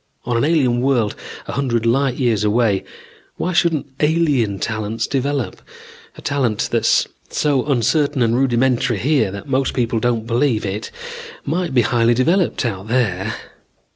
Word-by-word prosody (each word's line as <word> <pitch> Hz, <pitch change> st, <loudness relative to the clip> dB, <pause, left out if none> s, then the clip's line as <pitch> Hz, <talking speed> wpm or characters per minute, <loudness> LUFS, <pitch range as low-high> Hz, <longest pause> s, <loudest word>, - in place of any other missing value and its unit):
On 120 Hz, -, -1 dB
an 115 Hz, -, +2 dB
alien 135 Hz, -6 st, +2 dB
world 125 Hz, -6 st, +1 dB, 0.3 s
a -, -, -4 dB
hundred 120 Hz, -5 st, -1 dB
light 130 Hz, +2 st, +2 dB
years 120 Hz, -6 st, +1 dB
away, 105 Hz, -2 st, +2 dB, 0.5 s
why 180 Hz, -, -2 dB
shouldn't 170 Hz, -3 st, +2 dB
alien 150 Hz, -10 st, +2 dB
talents 110 Hz, +2 st, -2 dB
develop? 140 Hz, -1 st, -2 dB, 0.6 s
A -, -, -12 dB
talent 130 Hz, -7 st, 0 dB
that's -, -, +3 dB, 0.2 s
so 140 Hz, -4 st, +1 dB
uncertain 140 Hz, +1 st, +2 dB
and 115 Hz, 0 st, +2 dB
rudimentary 125 Hz, -2 st, +2 dB
here 130 Hz, -2 st, +2 dB
that 100 Hz, +1 st, -8 dB
most 135 Hz, -1 st, 0 dB
people 115 Hz, -2 st, 0 dB
don't 115 Hz, -1 st, 0 dB
believe 120 Hz, -1 st, +1 dB
it, 100 Hz, +2 st, -4 dB, 0.6 s
might 165 Hz, -1 st, -1 dB
be 120 Hz, -, +5 dB
highly 120 Hz, +1 st, +2 dB
developed 165 Hz, +4 st, +1 dB
out 100 Hz, -3 st, -3 dB
there. 110 Hz, -4 st, 0 dB
120 Hz, 145 wpm, -19 LUFS, 115-140 Hz, 0.6 s, be